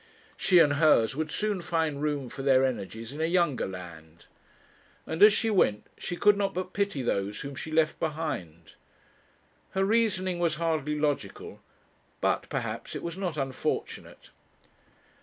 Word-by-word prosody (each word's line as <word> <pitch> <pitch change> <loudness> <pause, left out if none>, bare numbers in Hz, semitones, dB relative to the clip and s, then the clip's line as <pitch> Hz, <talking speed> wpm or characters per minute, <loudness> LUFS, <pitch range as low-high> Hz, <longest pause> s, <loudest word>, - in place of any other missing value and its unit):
She 185 - +3
and 150 -4 +6
hers 130 -7 +4
would 155 +1 -2
soon 210 -3 -1
find 160 -4 -1
room 145 -3 -1
for 135 - -8
their 135 -1 +4
energies 115 -1 -4
in 150 - -5
a - - +2
younger 170 -6 +1
land; 85 -3 -10 0.8
and 160 - -4
as 210 +1 +10
she 220 +2 +1
went 105 - +2
she 175 - -5
could 205 +2 +5
not 200 -2 -1
but 185 0 -4
pity 200 -10 -1
those 100 -3 -1
whom 140 -1 -6
she 155 +3 -7
left 155 -1 +2
behind. 95 - -4 1.0
Her 195 - +3
reasoning 190 -5 +1
was 170 -2 +1
hardly 155 -2 -1
logical, 145 -1 -3 0.6
but, - - 0
perhaps, - - -4
it - - -5
was 170 -1 -4
not 180 -5 -3
unfortunate. 135 -2 -4
155 Hz, 155 wpm, -28 LUFS, 130-180 Hz, 1.0 s, as